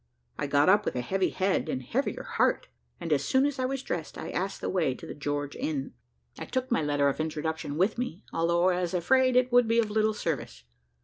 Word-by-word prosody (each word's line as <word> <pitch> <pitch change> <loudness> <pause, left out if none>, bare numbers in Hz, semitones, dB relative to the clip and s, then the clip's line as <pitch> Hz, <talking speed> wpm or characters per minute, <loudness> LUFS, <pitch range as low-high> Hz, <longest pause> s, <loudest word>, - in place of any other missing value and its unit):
I - - -1
got 145 +1 +3
up 200 +3 +5
with - - -3
a 125 - 0
heavy 190 +9 0
head, 190 -4 0
and 130 -3 -2
heavier 265 - -2
heart, - - +1 0.3
and - - -1
as - - +1
soon 265 +1 +3
as 285 -2 -2
I 255 - +1
was 270 0 -3
dressed, 165 -3 -4
I - - -5
asked 190 +2 -2
the - - -4
way 160 -9 +1
to - - -11
the - - -6
George 145 -1 -3
Inn. 140 -3 -3 0.5
I - - -5
took 255 -1 -3
my 235 - +2
letter 145 -1 +1
of 140 - -1
introduction 155 -1 -3
with 195 +7 +1
me, 210 -7 -4
although 170 +2 +2
I 180 0 +1
was 180 0 -2
afraid 255 +8 +3
it 250 0 +3
would 245 -1 +5
be 230 +1 +2
of 220 -2 +2
little 215 0 +2
service. 125 - -4
180 Hz, 235 wpm, -28 LUFS, 150-235 Hz, 0.5 s, up